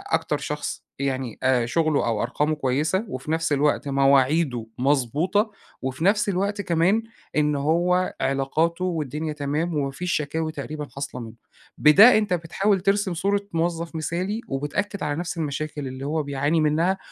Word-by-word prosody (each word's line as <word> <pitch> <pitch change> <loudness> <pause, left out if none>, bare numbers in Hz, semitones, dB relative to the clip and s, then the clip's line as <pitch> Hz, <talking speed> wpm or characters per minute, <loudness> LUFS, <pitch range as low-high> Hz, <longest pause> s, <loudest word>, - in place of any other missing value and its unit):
أكتر - - -1
شخص - - -4 0.2
يعني 130 -4 -2
آآ 130 -2 +3
شغله 155 +3 +1
أو 115 -2 0
أرقامه 150 +5 0
كويسة، 150 - 0
وفي 135 -1 -5
نفس 165 -1 +1
الوقت 145 0 +1
مواعيده 135 -1 +3
مضبوطة، 145 - +1 0.3
وفي 130 +6 -3
نفس 205 +1 +3
الوقت 200 +2 -1
كمان 180 +6 +2 0.3
إن 150 -1 +2
هو 175 +5 +1
علاقاته 145 +6 0
والدنيا 155 -2 -2
تمام 150 +3 -2
ومافيش 145 +5 -2
شكاوي 155 +2 -1
تقريبًا 150 +1 -6
حاصلة 140 -2 -5
منه، 115 -1 -8 0.4
بده 195 +12 +8
أنتَ 210 -4 0
بتحاول 185 +3 0
ترسم 195 -1 +1
صورة 200 +4 0
موظف 165 0 -1
مثالي، 180 +7 -2
وبتأكد 185 +9 -3
على 145 - -1
نفس 170 +1 -4
المشاكل 150 -2 -3
اللي 130 +1 -6
هو 155 +1 -1
بيعاني 145 +3 0
منها، 165 +5 +2
155 Hz, 145 wpm, -24 LUFS, 140-180 Hz, 0.4 s, بده